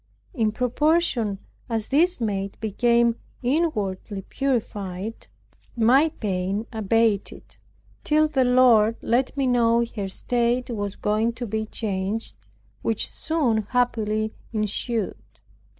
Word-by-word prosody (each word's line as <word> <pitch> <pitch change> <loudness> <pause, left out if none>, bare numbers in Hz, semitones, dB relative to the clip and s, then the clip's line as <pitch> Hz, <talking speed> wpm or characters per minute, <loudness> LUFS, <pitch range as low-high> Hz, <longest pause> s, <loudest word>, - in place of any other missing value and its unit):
In 220 -5 +1
proportion 250 - +1 0.3
as 225 -2 -1
this 340 +5 +3
maid 200 -3 -2
became 235 +2 +2 0.3
inwardly 210 - -1
purified, 210 -6 -3 0.5
my 260 +7 +5
pain 195 -3 -2
abated, 220 -1 0 0.5
till 310 +1 +3
the 280 -4 +2
Lord 245 -3 +5
let 255 +4 +1
me 275 - +1
know 235 -1 +3
her 200 -3 -2
state 240 +5 0
was 205 -3 -3
going 215 +3 0
to 240 +1 -5
be 220 0 -3
changed, 205 0 -2 0.5
which 225 -2 -1
soon 300 -9 0
happily 220 -3 0 0.2
ensued. 215 0 -1
230 Hz, 105 wpm, -24 LUFS, 210-250 Hz, 0.5 s, my